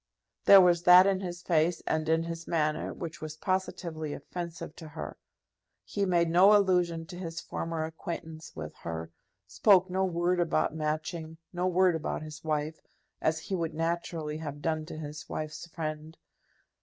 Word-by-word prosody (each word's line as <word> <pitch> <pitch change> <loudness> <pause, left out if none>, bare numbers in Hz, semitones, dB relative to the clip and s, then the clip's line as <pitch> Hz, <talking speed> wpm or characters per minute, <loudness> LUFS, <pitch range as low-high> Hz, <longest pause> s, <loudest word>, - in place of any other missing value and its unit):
There 195 -1 +10
was 175 -2 +4
that 180 +1 +9
in 195 -1 +2
his 180 -2 -6
face 165 0 +2
and 155 0 0
in 160 0 +3
his 165 0 -6
manner 155 -2 0
which 165 -2 -7
was 155 0 -6
positively 170 -5 -2
offensive 170 -3 -6
to 160 - -9
her. 155 +1 -7 0.7
He 200 -1 -1
made 170 -2 +3
no 190 +5 +7
allusion 180 -4 +1
to 175 - -9
his 165 -3 -5
former 165 0 -3
acquaintance 160 0 -7
with 75 -1 -6
her, 80 0 -5 0.3
spoke 185 - +4
no 190 +1 +1
word 175 0 +1
about 170 -2 +1
Matching, 160 +1 -3 0.2
no 180 +1 0
word 185 0 +4
about 155 -1 -3
his 155 -1 -9
wife, 155 0 -2 0.4
as 160 0 +2
he 195 - -6
would 165 -3 -2
naturally 165 -2 -2
have 145 -2 -6
done 155 0 -1
to 155 - -7
his 150 -1 -7
wife's 155 +2 -5
friend. 155 -1 -5
165 Hz, 165 wpm, -29 LUFS, 155-175 Hz, 0.7 s, There